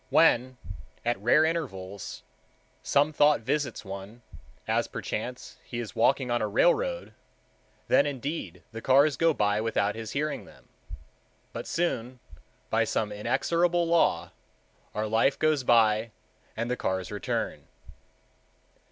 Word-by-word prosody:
When, 130 Hz, +1 st, +4 dB, 0.5 s
at 120 Hz, -4 st, 0 dB
rare 135 Hz, +8 st, +5 dB
intervals, 100 Hz, -, -4 dB, 0.6 s
some 145 Hz, +2 st, +2 dB
thought 145 Hz, -3 st, +4 dB
visits 130 Hz, -1 st, -2 dB
one, 100 Hz, +4 st, -8 dB, 0.4 s
as -, -, +1 dB
perchance 125 Hz, +3 st, -5 dB
he 120 Hz, -, -7 dB
is 120 Hz, -3 st, -5 dB
walking 130 Hz, -2 st, +2 dB
on 120 Hz, -, +1 dB
a -, -, 0 dB
railroad, -, -, +1 dB, 0.7 s
then, -, -, +4 dB
indeed, 135 Hz, -, -5 dB
the 115 Hz, 0 st, -7 dB
cars 140 Hz, +3 st, +4 dB
go 165 Hz, 0 st, +3 dB
by 105 Hz, -6 st, +1 dB
without 105 Hz, -2 st, 0 dB
his 110 Hz, 0 st, -7 dB
hearing 150 Hz, +2 st, -2 dB
them. -, -, -18 dB, 0.9 s
But -, -, -6 dB
soon, 130 Hz, -7 st, -2 dB, 0.5 s
by -, -, +3 dB
some 105 Hz, -2 st, -1 dB
inexorable 170 Hz, +11 st, +1 dB
law, 170 Hz, 0 st, +2 dB, 0.6 s
our 105 Hz, +1 st, -1 dB
life 110 Hz, +6 st, +2 dB
goes 155 Hz, -3 st, +2 dB
by 115 Hz, -2 st, +4 dB, 0.5 s
and 115 Hz, +1 st, -1 dB
the -, -, +1 dB
cars 95 Hz, -6 st, -2 dB
return. -, -, -3 dB
125 Hz, 125 wpm, -28 LUFS, 110-150 Hz, 0.9 s, rare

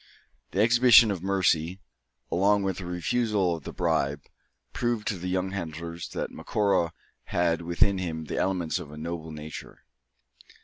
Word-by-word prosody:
The 95 Hz, -, 0 dB
exhibition 120 Hz, -1 st, +7 dB
of 95 Hz, -4 st, -3 dB
mercy, 95 Hz, -2 st, +1 dB, 0.5 s
along 100 Hz, +3 st, +3 dB
with 95 Hz, -1 st, -2 dB
the 90 Hz, -, -6 dB
refusal 95 Hz, +1 st, 0 dB
of 80 Hz, -, -11 dB
the -, -, -5 dB
bribe, 70 Hz, +1 st, 0 dB, 0.5 s
proved 120 Hz, -3 st, -1 dB
to 100 Hz, -, -2 dB
the 90 Hz, -, -4 dB
young 95 Hz, +1 st, -1 dB
hunters, 85 Hz, -2 st, -5 dB
that -, -, -4 dB
Macora 100 Hz, -5 st, 0 dB, 0.3 s
had 85 Hz, -1 st, +1 dB
within 85 Hz, +3 st, +2 dB
him 80 Hz, -3 st, -4 dB
the -, -, -4 dB
elements 90 Hz, -3 st, 0 dB
of 85 Hz, -5 st, -9 dB
a 75 Hz, -, -10 dB
noble 80 Hz, 0 st, -5 dB
nature. 75 Hz, 0 st, -9 dB
90 Hz, 150 wpm, -27 LUFS, 80-100 Hz, 0.5 s, exhibition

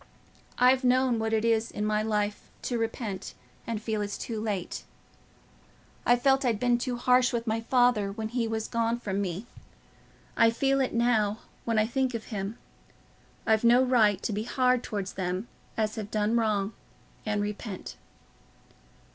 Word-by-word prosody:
I've 255 Hz, +1 st, +5 dB
known 250 Hz, -1 st, +3 dB
what 220 Hz, 0 st, -1 dB
it 220 Hz, 0 st, +1 dB
is 230 Hz, -1 st, +2 dB
in 210 Hz, -, -3 dB
my 215 Hz, 0 st, +1 dB
life 210 Hz, -1 st, -1 dB
to 240 Hz, -2 st, -1 dB
repent 225 Hz, -3 st, -4 dB, 0.3 s
and 230 Hz, -2 st, -2 dB
feel 215 Hz, -1 st, -2 dB
it's 205 Hz, -1 st, -3 dB
too 225 Hz, -3 st, -4 dB
late. 205 Hz, -5 st, -3 dB, 1.2 s
I 245 Hz, -, +7 dB
felt 270 Hz, +2 st, +3 dB
I'd 235 Hz, -5 st, +1 dB
been 245 Hz, 0 st, +2 dB
too 245 Hz, 0 st, -2 dB
harsh 250 Hz, +1 st, +4 dB
to 235 Hz, -2 st, -2 dB
my 225 Hz, 0 st, 0 dB
father 245 Hz, -4 st, +3 dB
when 220 Hz, +1 st, -4 dB
he 240 Hz, -1 st, -1 dB
was 220 Hz, -1 st, -2 dB
gone 230 Hz, 0 st, 0 dB
from 200 Hz, -3 st, -2 dB
me—I 200 Hz, +3 st, -3 dB
feel 270 Hz, +4 st, +1 dB
it 255 Hz, -, -1 dB
now, 220 Hz, -3 st, +2 dB, 0.2 s
when 230 Hz, -1 st, 0 dB
I 215 Hz, -, +4 dB
think 255 Hz, +1 st, 0 dB
of 225 Hz, -, -4 dB
him. 200 Hz, +3 st, -3 dB, 0.9 s
I've 220 Hz, 0 st, +3 dB
no 240 Hz, +2 st, +6 dB
right 225 Hz, -6 st, +4 dB
to 215 Hz, -, -1 dB
be 210 Hz, -, -1 dB
hard 250 Hz, +1 st, +2 dB
towards 200 Hz, -5 st, -4 dB
them 185 Hz, +3 st, -3 dB, 0.3 s
as 215 Hz, -1 st, 0 dB
have 210 Hz, -2 st, -4 dB
done 215 Hz, +1 st, +1 dB
wrong 215 Hz, -2 st, +1 dB, 0.5 s
and 210 Hz, -1 st, -1 dB
repent." 205 Hz, -1 st, -5 dB
225 Hz, 165 wpm, -28 LUFS, 210-245 Hz, 1.2 s, I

